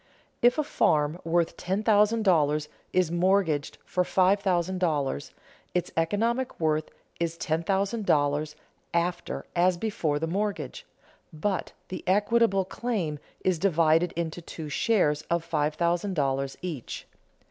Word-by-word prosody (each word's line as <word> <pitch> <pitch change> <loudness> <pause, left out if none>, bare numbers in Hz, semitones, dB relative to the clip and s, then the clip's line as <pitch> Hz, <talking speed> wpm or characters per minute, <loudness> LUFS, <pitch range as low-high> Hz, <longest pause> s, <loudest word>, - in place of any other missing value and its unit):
If 245 +4 +5
a 305 - +2
farm 155 - +1
worth 165 0 +1
ten 190 +4 -2
thousand 215 +1 +4
dollars 150 -5 +2 0.2
is 180 -3 +2
mortgaged 175 -4 +1
for 180 - +1
five 190 +2 +3
thousand 185 -1 0
dollars, 145 - -1 0.4
its 180 - 0
economic 230 +10 0
worth 155 -1 +1 0.3
is 170 -1 -1
ten 160 0 -1
thousand 200 +4 -1
dollars 145 +1 +2 0.4
after 175 +1 -1
as 180 0 +3
before 170 -7 -1
the 155 - -1
mortgage, 200 +5 -3 0.4
but 180 +4 -2 0.2
the 185 - -6
equitable 205 0 +3
claim 185 -9 -2 0.3
is 185 -3 +2
divided 165 -2 +3
into 170 0 -3
two 160 -2 -7
shares 150 -3 +2
of 170 -1 +1
five 150 -2 0
thousand 175 +3 0
dollars 135 -2 -1
each. 160 -10 -5
175 Hz, 135 wpm, -27 LUFS, 155-195 Hz, 0.4 s, If